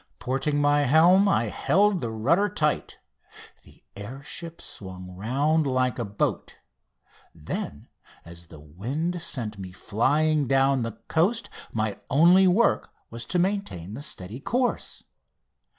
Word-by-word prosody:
Porting 135 +3 -1
my 145 0 +3
helm 170 +8 +5
I 115 - +2
held 195 - +2
the 115 - -2
rudder 150 - +1
tight. 150 -7 -1 0.7
The - - -20
air 120 +8 -8
ship 170 +3 -6
swung 95 -2 -8
round 140 - +1
like 130 -1 0
a 120 - -1
boat; 100 0 -3 0.8
then 80 -2 -6 0.4
as 85 0 -12
the 75 - -13
wind 130 - -4
sent 110 -10 -4
me 95 -1 -7
flying 145 +9 +1
down 135 0 +3
the 115 -2 -4
coast 200 +9 +1 0.2
my 110 -2 -2
only 175 +7 +6
work 205 +6 +2 0.2
was 115 +1 -6
to 180 - -1
maintain 175 - -2
the 130 - -7
steady 110 -5 -7
course. 245 - -2
135 Hz, 135 wpm, -25 LUFS, 110-170 Hz, 0.8 s, only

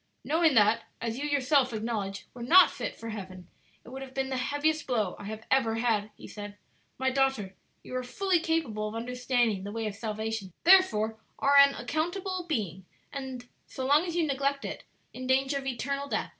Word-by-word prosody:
"Knowing 320 -2 +3
that, 220 +1 +4
as 230 +2 -3
you 290 - -2
yourself 275 -2 +3
acknowledge, 215 -3 -3
you - - -23
were 245 - -10
not 340 +10 +7
fit - - -5
for 230 - -8
heaven, 185 -4 -8 0.4
it - - -13
would 265 +2 -7
have 265 -1 -9
been 265 0 -1
the 265 - -2
heaviest 295 +4 0
blow 215 -8 0
I - - -8
have 220 +1 -7
ever 230 -4 +3
had," 225 -3 0
he - - -11
said. 205 -1 -8 0.4
"My 260 0 +1
daughter, 265 -8 0 0.3
you - - -7
are 255 - 0
fully 365 +8 +1
capable 310 -11 -1
of 215 - -6
understanding 240 -3 0
the 200 - -5
way 225 +1 -3
of 210 - -2
salvation, 220 -2 -4
therefore 225 - +5 0.2
are 280 +1 +3
an 280 0 +8
accountable 350 +7 -2
being, 190 - -3 0.3
and, 260 -3 -6 0.2
so 260 - -5
long 290 +4 +4
as 340 - -4
you 340 -2 +2
neglect 280 0 -1
it, - - -6 0.3
in 255 0 -6
danger 270 +2 +2
of 270 - -7
eternal 275 +3 -2
death. - - -2
255 Hz, 200 wpm, -29 LUFS, 220-280 Hz, 0.4 s, an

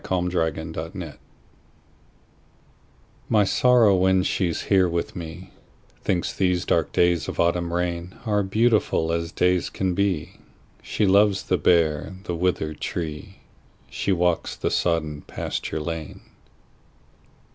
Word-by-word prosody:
My 95 - +1
November 80 -2 -2
Guest 80 -3 -11 2.1
MY 105 -2 +4
Sorrow, 115 0 +4
when 95 0 +3
she's 90 -3 -1
here 95 -3 +3
with 85 +2 -3
me, 90 +2 -8 0.5
Thinks 90 -2 -1
these 90 -2 0
dark - - +1
days 85 -2 +2
of - - -6
autumn 85 0 +1
rainAre 90 +4 -2
beautiful 110 -6 +2
as 85 0 -2
days 90 -1 +1
can 95 -1 -1
be; 95 -5 -1 0.4
She 105 - -1
loves 100 0 +4
the - - +1
bare, 85 +1 +2
the 90 - -4
withered 85 -3 -1
tree; 75 -3 -5 0.5
She - - -1
walks 90 -2 0
the - - -2
sodden 80 -4 0
pasture - - -4
lane. 80 0 -5
90 Hz, 120 wpm, -24 LUFS, 85-95 Hz, 2.1 s, MY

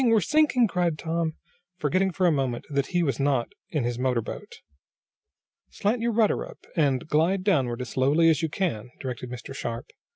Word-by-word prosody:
We're 225 -3 +5
sinking!" 295 - +3
cried 175 -5 0
Tom, 165 -1 -2 0.4
forgetting 185 +5 +1
for 185 +1 0
a 175 - +5
moment 135 -5 -1
that 140 -1 0
he 175 -1 +1
was 140 -3 -1
not 135 -4 +1 0.2
in 150 -5 -1
his 120 0 -2
motor 125 -3 +1
boat. - - -7 1.2
"Slant 225 +4 -1
your 235 0 +1
rudder 220 -2 +2
up, - - -12
and 145 -2 +1
glide 170 +5 +2
downward 130 - +1
as 125 - -5
slowly 145 +6 +3
as 160 0 +4
you 160 - 0
can!" 145 - -2
directed 125 -2 -5
Mr. 125 +2 -7
Sharp. 115 -3 -4
155 Hz, 185 wpm, -26 LUFS, 130-185 Hz, 1.2 s, We're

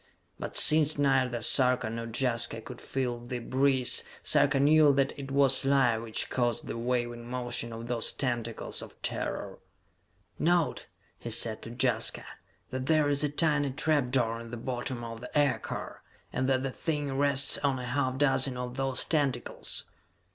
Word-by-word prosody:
But - - -2
since 155 0 +6
neither 130 -4 +1
Sarka 125 -1 +3
nor 115 +1 -5
Jaska 115 -1 -1
could 120 +2 -10
feel 125 -3 -3
the 120 +1 -6
breeze, 130 +1 +3 0.2
Sarka 140 -1 +3
knew 150 +1 +5
that 135 0 +1
it 140 -1 -8
was 135 -1 +3
life 135 -5 +2
which 115 -1 -4
caused 120 -2 -1
the - - -5
waving 120 0 -3
motion 120 -2 -2
of 115 0 -7
those 120 -1 0
tentacles 120 -4 -3
of - - -12
terror. 100 -2 -3 0.8
"Note," 170 -1 +1 0.3
he 120 - -7
said 110 -1 +1
to - - -9
Jaska, 115 -3 0 0.5
"that 130 0 -4
there 155 -2 +3
is 145 0 +2
a 150 - +1
tiny 145 -1 +1
trap 145 -1 0
door 115 -3 0
in 115 0 -9
the 120 - -6
bottom 120 0 -4
of 115 -1 -7
the 125 - -5
aircar, 145 -2 -1 0.3
and 130 +1 -1
that 130 -1 +1
the 135 - -2
thing 145 -2 -3
rests 140 0 +2
on 140 -2 0
a 125 - -5
half 130 +1 -1
dozen 135 -2 +2
of 125 +1 -6
those 135 -1 +1
tentacles!" 140 -6 0
130 Hz, 165 wpm, -29 LUFS, 120-140 Hz, 0.8 s, since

